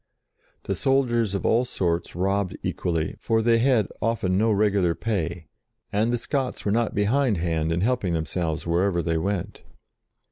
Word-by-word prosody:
The 100 - -2
soldiers 120 -2 +1
of 100 - -3
all 115 +2 +3
sorts 85 -10 -2
robbed 95 +1 0
equally, 80 -3 -2
for 110 0 +1
they 115 0 +4
had 120 -4 +3
often 105 -5 0
no 110 +3 +3
regular 100 -4 +2
pay, 90 -6 -2 0.5
and 110 +3 +2
the 120 - +1
Scots 130 +1 -3
were 100 - +1
not 115 +1 0
behindhand 100 - +1
in 85 +1 0
help 125 +3 +1
ing 90 -3 0
themselves 80 0 -2
wherever 85 +1 +1
they 80 0 0
went. 95 +1 -3
100 Hz, 155 wpm, -25 LUFS, 85-115 Hz, 0.5 s, they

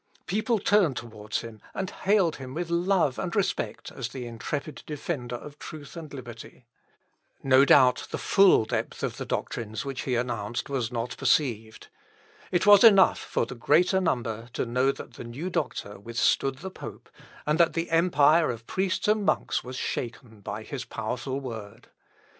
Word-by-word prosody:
People 215 +5 0
turned 195 -9 +3
towards 110 -2 -4
him, 110 -2 -10
and 190 -1 -3
hailed 190 -4 +2
him 130 0 -8
with 170 0 -3
love 170 -5 +2
and 180 -2 -3
respect 195 -1 -2
as 130 -3 -4
the 125 0 -6
intrepid 120 +6 -5
defender 145 -5 -4
of 145 +4 -10
truth 150 -1 -9
and 160 -3 -8
liberty. 120 -2 -10 0.8
No 135 0 +6
doubt 130 -3 +5
the - - -3
full 195 - +5
depth - - -3
of - - -2
the - - -5
doctrines 110 0 -3
which 135 -2 -4
he 125 - -1
announced 120 0 -3
was 125 -4 -1
not 120 0 -3
perceived. 110 -7 0 0.6
It 175 0 +2
was 205 0 +8
enough 200 -5 +7
for - - -1
the 115 - -8
greater 180 - +3
number 120 -8 -2
to - - -1
know 125 +3 +2
that 125 - -10
the - - -8
new 135 +10 -5
doctor 100 - -3
withstood 115 +5 +1
the 190 +6 -7
pope, - - -9 0.4
and 150 +2 +1
that 170 -1 +4
the 165 0 -2
empire 165 -1 +4
of 115 -1 -5
priests 190 - -1
and 210 0 +3
monks - - 0
was 125 +1 -7
shaken 120 -3 -5
by 105 +2 -5
his 135 +2 -5
powerful 125 +4 -4
word. 110 -6 -8
135 Hz, 170 wpm, -27 LUFS, 115-170 Hz, 0.8 s, was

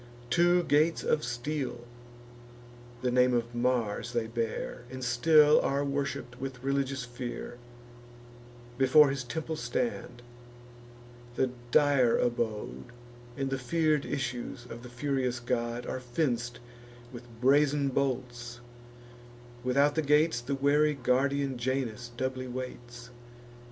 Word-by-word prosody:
Two 175 +1 +4
gates 155 +1 +2
of 150 - +1
steel 125 +1 -3 1.2
(the 125 - +1
name 125 0 +4
of 120 0 -1
Mars 120 -1 -1
they 120 -2 0
bear, 115 +1 -4
And 130 0 -7
still 150 +5 +5
are 140 +1 0
worship'd 140 -3 -3
with 130 -2 -6
religious 135 -1 -1
fear) 120 0 -7 1.2
Before 135 +2 +6
his 135 -2 -3
temple 160 +5 -4
stand: 195 - -3 1.1
the 130 0 +1 0.2
dire 135 -3 +4
abode, 120 -1 -2 0.5
And 135 -1 -2
the 135 - -1
fear'd 155 +2 +1
issues 125 -3 -4
of 120 -1 -9
the 125 - -10
furious 130 -1 -1
god, 120 0 -2
Are - - -3
fenc'd 120 -2 -2 0.6
with 120 0 -9
brazen 140 +2 +3
bolts; 125 -3 -2 1.0
without 140 +3 +3
the 160 - +1
gates, 150 -2 +3
The 135 +3 -2
wary 145 +2 +3
guardian 135 +1 0
Janus 125 -2 -2
doubly 130 0 -2
waits. 120 -1 -7
130 Hz, 115 wpm, -29 LUFS, 120-140 Hz, 1.2 s, Before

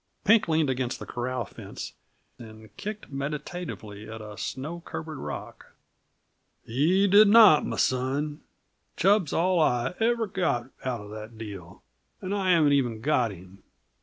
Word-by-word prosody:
Pink 220 +2 +5
leaned 160 -2 +2
against 130 -1 -1
the - - -8
corral 125 -1 -3
fence - - -9 0.5
and 110 -2 -13
kicked 210 - -7
meditatively 140 - -6
at 110 0 -7
a 105 -1 -9
snow 150 +10 -5
covered 160 -3 -7
rock. - - -8 0.9
"He 160 - +2
did 205 +2 +7
not, 205 -7 +8
m' - - -4
son. 140 +4 0 0.6
Chub's 195 -4 +3
all 180 +1 +2
I 125 -4 +1
ever 230 0 +2
got 170 - -1
out 125 -4 -2
uh 105 - -10
the 105 +1 -8
deal 105 -6 -10 0.4
and 190 +1 -4
I 195 -2 0
haven't 160 -5 +5
even 120 -5 +1
got 125 -2 +1
him. 95 0 -13
140 Hz, 145 wpm, -27 LUFS, 115-180 Hz, 0.9 s, not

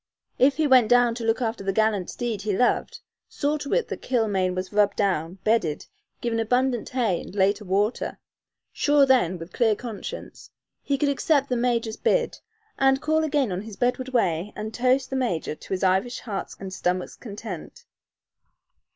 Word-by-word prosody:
If 270 +2 +5
he 315 - +2
went 255 -6 +5
down 245 -1 +5
to 230 0 -6
look 225 +2 +1
after 225 -3 -2
the 195 - 0
gallant 210 -2 +1
steed 235 -5 -3
he 205 -2 -1
loved 250 - +1 0.3
saw 295 +2 -1
to 285 - -6
it - - +1
that - - -5
Kilmaine 200 -7 0
was 185 +2 -4
rubbed 205 -1 +3
down, 180 -4 0
bedded, 215 -9 +1 0.4
given 230 -1 -1
abundant 245 +1 +1
hay 230 -9 0
and - - -11
later 200 +2 +2
water 200 +5 0 0.6
sure 290 -1 +4
then, 240 -10 +3
with 165 +1 -10
clear 225 -4 +3
conscience, 225 -2 -8 0.3
he 280 - 0
could 290 - +1
accept 280 0 +1
the 250 - +1
major's 235 -2 0
"bid," - - +1 0.4
and 270 0 +4
call 315 +2 +1
again 285 -7 +1
on 180 +1 -2
his 215 -1 -10
bedward 250 +1 0
way 195 -6 0
and 215 +1 -5
toast 255 +3 +1
the - - -1
major 235 -13 -1
to - - -14
his 190 0 -1
Irish 190 +7 +1
heart's 210 -4 -5
and 190 -1 -7
stomach's 180 -1 -2
content. 205 -5 -8
225 Hz, 175 wpm, -25 LUFS, 195-255 Hz, 0.6 s, If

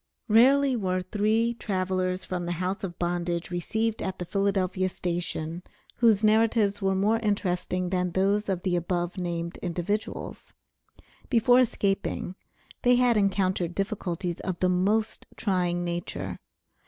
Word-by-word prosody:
Rarely 265 +5 +5
were 185 -4 -1
three 215 +4 +1
travelers 185 -2 -1
from 180 -1 -3
the 175 - -1
house 185 +4 -3
of 175 -3 -5
bondage 175 0 -2
received 220 +6 -1
at 190 - -3
the 180 - -5
Philadelphia 190 -1 0
station 170 -2 -3 0.4
whose 225 -3 +4
narratives 215 -1 +3
were 195 0 +1
more 210 +4 +2
interesting 185 -4 -1
than 180 -1 +1
those 200 +2 +1
of 185 -2 -1
the 185 -2 +1
above 175 +1 -2
named 170 -1 -3
individuals. 180 +5 -4 0.7
Before 245 0 +5
escaping 200 -6 0 0.5
they 245 -1 +5
had 245 -1 +4
encountered 185 -4 +1
difficulties 185 -4 -3
of 185 -3 -4
the 185 - +2
most 205 +5 0
trying 180 -3 0
nature. 175 0 -4
190 Hz, 130 wpm, -27 LUFS, 175-210 Hz, 0.7 s, Rarely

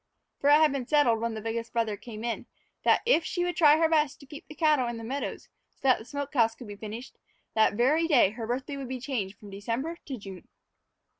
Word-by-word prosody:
For 280 - +2
it - - +8
had 310 -1 +5
been 265 -3 -3
settled, 285 -7 +3
when 230 0 -2
the 220 - -5
biggest 230 +1 -4
brother 225 -3 0
came 215 +1 -9
in, 235 -1 -3 0.4
that - - +4
if 470 -9 +4
she 350 +2 -2
would 355 0 -1
try 300 -2 +6
her 325 0 +4
best 305 -3 +1
to 280 - -14
keep 290 +4 -11
the 305 - -11
cattle 300 -6 +3
in 235 -1 -4
the 230 - -8
meadows 270 +5 -4 0.2
so - - -44
that 260 -2 +4
the 220 - -11
smoke 285 +1 -5
house 225 -4 +3
could 250 - -11
be 205 - -7
finished, 220 +5 -8 0.3
that 220 -2 +3
very 295 +8 +3
day 255 - +5
her 225 0 -6
birthday 260 +4 -3
would 270 -2 -6
be 260 -1 -4
changed 230 -7 -3
from 205 -2 -12
December 235 +12 -4
to 270 -3 -4
June. 195 -4 -10
250 Hz, 240 wpm, -28 LUFS, 225-295 Hz, 0.4 s, it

